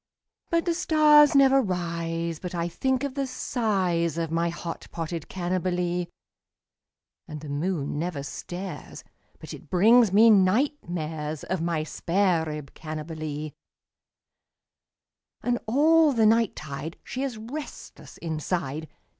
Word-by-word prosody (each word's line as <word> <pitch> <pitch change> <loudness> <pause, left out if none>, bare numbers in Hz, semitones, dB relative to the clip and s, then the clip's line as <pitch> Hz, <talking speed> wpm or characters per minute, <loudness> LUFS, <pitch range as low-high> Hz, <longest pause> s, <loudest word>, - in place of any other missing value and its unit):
But 335 0 +1
the 345 - +1
stars 300 -3 +5
never 270 0 +6
rise 170 -4 -3
but 180 -1 -6
I 170 0 -1
think 260 +9 -1
of 280 -2 -2
the 275 -1 -2
size 190 - 0
Of 165 -1 -2
my 170 +1 +1
hot 170 0 -6
potted 165 -1 -5
Cannibalee, 180 -1 -1 1.2
And 150 -1 -7
the 150 - -8
moon 145 -1 -2
never 160 -4 -3
stares 180 +6 -7 0.4
but - - -9
it - - -12
brings 220 +4 +5
me 220 +3 +7
night 215 +10 +3
mares 155 -3 -4
Of 185 -3 -2
my 165 -2 -1
spare 170 +1 +1
rib 150 -3 -6
Cannibalee; 155 -1 -5 1.9
And 245 0 0
all 305 +5 +4
the 225 -3 +3
night 225 0 +3
tide 150 +2 -6
she 255 - -5
is 265 -5 -3
restless 265 +8 -9
inside. 160 -2 -3
180 Hz, 130 wpm, -26 LUFS, 160-235 Hz, 1.9 s, me